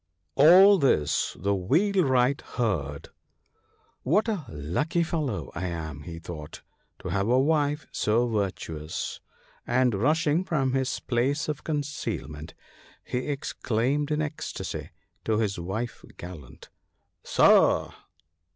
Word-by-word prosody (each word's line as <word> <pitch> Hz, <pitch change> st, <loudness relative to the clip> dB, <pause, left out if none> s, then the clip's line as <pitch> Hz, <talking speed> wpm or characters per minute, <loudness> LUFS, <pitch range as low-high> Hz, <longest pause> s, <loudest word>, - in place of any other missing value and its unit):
All 185 Hz, +7 st, +7 dB
this 75 Hz, -, +1 dB
the 100 Hz, +2 st, +1 dB
Wheelwright 135 Hz, -, +2 dB, 0.2 s
heard. 80 Hz, -, -2 dB, 0.5 s
" -, -, -39 dB
What 205 Hz, -, +2 dB
a 200 Hz, -10 st, -2 dB
lucky 90 Hz, -, -1 dB
fellow 135 Hz, -, -3 dB
I 90 Hz, +1 st, -3 dB
am," 80 Hz, -4 st, -5 dB
he 85 Hz, +1 st, -8 dB
thought, 80 Hz, -2 st, -9 dB, 0.2 s
" -, -, -45 dB
to -, -, -4 dB
have 100 Hz, +1 st, 0 dB
a 125 Hz, +2 st, +4 dB
wife 150 Hz, 0 st, +1 dB
so 115 Hz, +3 st, +1 dB
virtuous," 90 Hz, -8 st, -3 dB, 0.5 s
and 125 Hz, 0 st, +2 dB
rush 150 Hz, +11 st, +1 dB
war. 145 Hz, -, +3 dB
97 -, -, +3 dB
ing -, -, -2 dB
from 135 Hz, -7 st, 0 dB
his 135 Hz, -1 st, -1 dB
place 135 Hz, +5 st, 0 dB
of 150 Hz, -2 st, -4 dB
concealment, 140 Hz, -, -4 dB, 0.5 s
he 125 Hz, 0 st, -3 dB
exclaimed 140 Hz, 0 st, -1 dB
in 155 Hz, 0 st, 0 dB
ecstasy 150 Hz, 0 st, -5 dB, 0.3 s
to 110 Hz, -1 st, +1 dB
his 105 Hz, -4 st, -1 dB
wife's 110 Hz, +8 st, -4 dB
gallant, 85 Hz, -7 st, -11 dB, 0.3 s
" -, -, -49 dB
Sir -, -, +4 dB
125 Hz, 135 wpm, -27 LUFS, 90-150 Hz, 0.5 s, All